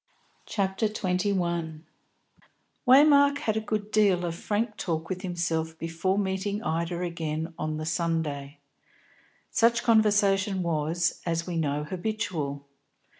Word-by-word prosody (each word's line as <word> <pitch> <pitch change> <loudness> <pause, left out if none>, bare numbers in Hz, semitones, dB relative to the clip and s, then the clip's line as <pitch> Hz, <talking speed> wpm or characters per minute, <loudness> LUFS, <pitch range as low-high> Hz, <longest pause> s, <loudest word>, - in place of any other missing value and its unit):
CHAPTER 195 +1 0
XXI 190 -4 -1
DIPLOMACY 170 -5 -1 1.0
Waymark 285 +1 +6
had 220 -6 -1
a 220 - 0
good 215 -1 -3
deal 195 -5 +3
of 170 - -2
frank 210 +5 -2
talk 165 -2 -3
with 185 -1 -3
himself 165 -3 -2
before 165 +4 -1
meeting 200 +2 -1
Ida 170 +2 -2
again 165 -1 -3
on 155 -1 -3
the 155 - -4
Sunday. 160 -4 -2 0.9
Such 235 +1 +3
conversation 205 -4 +3
was, 165 +1 0
as 170 -1 -1
we 175 - -4
know, 150 -2 0
habitual. 170 -6 -3
180 Hz, 125 wpm, -27 LUFS, 160-205 Hz, 1.0 s, Waymark